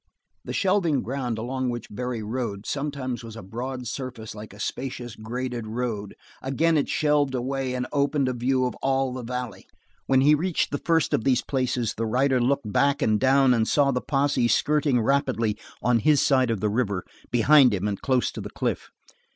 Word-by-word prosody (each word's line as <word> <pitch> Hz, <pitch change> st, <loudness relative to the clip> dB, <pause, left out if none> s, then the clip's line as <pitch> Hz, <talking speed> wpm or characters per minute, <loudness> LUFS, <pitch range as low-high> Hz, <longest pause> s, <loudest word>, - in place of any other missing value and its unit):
The -, -, -6 dB
shelving 185 Hz, -8 st, +1 dB
ground 125 Hz, -2 st, -3 dB
along 130 Hz, +3 st, -2 dB
which 120 Hz, -2 st, -4 dB
Barry 120 Hz, 0 st, -4 dB
rode 105 Hz, -3 st, -4 dB
sometimes 140 Hz, -4 st, -3 dB
was 115 Hz, -1 st, -9 dB
a 115 Hz, -, -8 dB
broad 125 Hz, +6 st, -5 dB
surface 125 Hz, -3 st, -6 dB
like 105 Hz, 0 st, -9 dB
a 100 Hz, -, -14 dB
spacious, 120 Hz, 0 st, -4 dB
graded 120 Hz, +1 st, -4 dB
road; 110 Hz, -3 st, -3 dB, 0.3 s
again 160 Hz, +5 st, +1 dB
it 145 Hz, -, +1 dB
shelved 150 Hz, -3 st, +2 dB
away 130 Hz, +1 st, -2 dB
and 125 Hz, 0 st, -2 dB
opened 140 Hz, -1 st, +1 dB
a 130 Hz, -, 0 dB
view 130 Hz, +2 st, +1 dB
of 125 Hz, -, -2 dB
all 135 Hz, -1 st, +1 dB
the 130 Hz, -, -5 dB
valley. 125 Hz, 0 st, -5 dB, 0.4 s
When 130 Hz, -1 st, +4 dB
he 145 Hz, +3 st, +6 dB
reached 170 Hz, +3 st, 0 dB
the 145 Hz, -, -2 dB
first 165 Hz, -3 st, +2 dB
of -, -, +1 dB
these 130 Hz, -1 st, +2 dB
places 125 Hz, -4 st, -1 dB
the 115 Hz, 0 st, -3 dB
rider 130 Hz, +3 st, +2 dB
looked 125 Hz, -4 st, 0 dB
back 140 Hz, 0 st, +2 dB
and 110 Hz, -1 st, +2 dB
down 135 Hz, 0 st, +4 dB
and 110 Hz, -2 st, +1 dB
saw 140 Hz, -2 st, +3 dB
the 125 Hz, -1 st, -1 dB
posse 135 Hz, -3 st, +1 dB
skirting 145 Hz, 0 st, +2 dB
rapidly 120 Hz, -3 st, +1 dB, 0.3 s
on 120 Hz, -1 st, +3 dB
his 145 Hz, +5 st, +4 dB
side 130 Hz, -3 st, +3 dB
of 110 Hz, -4 st, -1 dB
the 105 Hz, -, +1 dB
river, 100 Hz, -5 st, -1 dB, 0.2 s
behind 130 Hz, +2 st, +6 dB
him 100 Hz, 0 st, -1 dB
and 100 Hz, -2 st, -3 dB
close 130 Hz, -2 st, +1 dB
to -, -, -7 dB
the -, -, -6 dB
cliff. -, -, -3 dB
125 Hz, 190 wpm, -25 LUFS, 115-140 Hz, 0.4 s, he